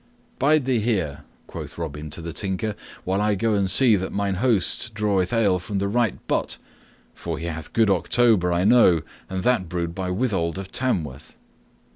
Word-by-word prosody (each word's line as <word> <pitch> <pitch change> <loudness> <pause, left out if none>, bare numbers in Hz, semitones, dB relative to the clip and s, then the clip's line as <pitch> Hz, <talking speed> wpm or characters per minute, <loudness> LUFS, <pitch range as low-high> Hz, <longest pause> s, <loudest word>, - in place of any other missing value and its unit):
"Bide 145 +1 +3
thou 130 -3 +1
here," 85 -11 -1 0.2
quoth - - -8
Robin 75 -2 -5
to 80 +3 -4
the 85 -1 -5
Tinker, 100 +4 -3 0.3
"while 95 +2 0
I 105 0 +2
go 115 +2 0
and 100 -2 +1
see 120 +1 +6
that 95 0 -4
mine 100 -1 -1
host 115 -1 +1
draweth 100 -3 0
ale 105 -6 +2
from 100 +3 -4
the 100 +1 0
right 115 -1 -1
butt, - - -1 0.6
for 85 -2 -5
he 80 - -6
hath 80 -2 -5
good 110 -3 +3
October, 95 0 +3
I 85 +1 +1
know, 100 -8 +5 0.3
and 95 -1 -3
that 120 -9 +1
brewed 85 -1 -3
by 95 0 -4
Withold 95 -5 -1
of 95 0 -7
Tamworth." 80 - -2
95 Hz, 180 wpm, -23 LUFS, 85-115 Hz, 0.6 s, see